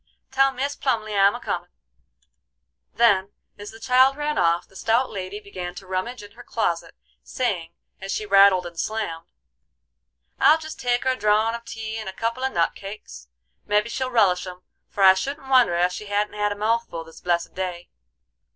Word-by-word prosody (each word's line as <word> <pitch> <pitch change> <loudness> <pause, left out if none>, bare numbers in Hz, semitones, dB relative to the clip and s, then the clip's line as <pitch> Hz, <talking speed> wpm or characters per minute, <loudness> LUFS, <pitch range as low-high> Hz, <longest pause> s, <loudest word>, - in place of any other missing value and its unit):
Tell 270 0 +4
Mis 275 +2 -3
Plumly 215 -5 -1
I'm 200 0 +4
a - - -6
comin'." - - -4 1.3
Then, 205 -4 +3 0.3
as 205 0 -8
the 225 - -12
child 260 +3 +4
ran 300 0 -1
off, 170 0 +2
the 190 - -23
stout 230 +6 +1
lady 195 0 -5
began 185 -4 -7
to 195 - -10
rummage 190 +5 -4
in 205 - -12
her 240 - -14
closet, 175 -8 -2 0.3
saying, 175 - -3 0.3
as 195 0 -6
she 215 - -2
rattled 195 -2 +5
and 170 -1 -8
slammed: 170 -7 -3 1.1
"I'll 310 - +6
jest 315 -1 -9
take 245 -1 0
her 260 - +2
a - - -1
drawin' 215 +1 +2
of 235 0 -7
tea 225 -1 -6
and 215 -3 -5
a - - -8
couple 230 +5 -3
of 265 - 0
nut 170 -1 +1
cakes: 195 - -10 0.4
mebby 210 +2 +2
she'll 260 +2 -2
relish 195 -7 +2
'em, 180 0 -10 0.3
for 200 - -1
I 190 0 +9
shouldn't 270 +7 -5
wonder 250 -9 +5
ef 175 +1 +2
she 210 +3 -7
hadn't 205 +1 -1
had 210 0 0
a - - -2
mouthful 215 -5 -1
this 165 0 -15
blessed 175 -1 -1
day. 180 -2 -5
210 Hz, 190 wpm, -23 LUFS, 185-235 Hz, 1.3 s, I